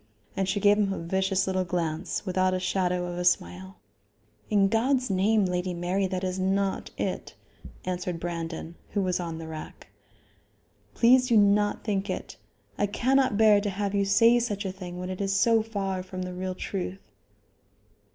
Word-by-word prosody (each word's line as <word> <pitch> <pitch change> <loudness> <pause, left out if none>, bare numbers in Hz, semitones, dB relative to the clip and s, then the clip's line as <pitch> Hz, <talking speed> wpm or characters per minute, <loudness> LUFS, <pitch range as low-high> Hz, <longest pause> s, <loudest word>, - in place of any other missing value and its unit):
And 195 -1 -1
she 200 +2 0
gave 205 +1 +4
him 200 -2 +2
a - - -3
vicious 190 +3 0
little 185 -1 0
glance 170 +1 -2
without 185 0 +1
a - - -1
shadow 180 -1 0
of 175 0 -5
a - - -1
smile. 95 - 0 0.7
"In 200 -2 +4
God's 250 +3 +1
name, 200 +2 +3
Lady 180 0 -2
Mary, 180 +3 0
that 185 0 -3
is 185 0 -2
not 195 +1 0
it," - - -3 0.5
answered 180 -1 -3
Brandon, 165 -1 -5 0.2
who 205 - +1
was 180 -1 0
on 165 -2 -4
the 165 0 -7
rack. 160 -1 -9 1.1
"Please 250 +2 +5
do 235 -3 +4
not 205 0 +3
think 200 -2 -1
it. - - -5 0.4
I 205 - +2
cannot 260 +2 +2
bear 210 -2 +6
to 205 - -1
have 200 +1 -2
you 200 -1 +2
say 230 +4 +5
such 205 -4 -2
a 190 - -2
thing 180 -2 -8
when 180 +1 -4
it 185 - -5
is 195 0 0
so 225 +2 +4
far 195 -4 -3
from 185 0 -6
the 180 0 -5
real 185 0 -4
truth." 185 - -5
190 Hz, 180 wpm, -27 LUFS, 180-205 Hz, 1.1 s, bear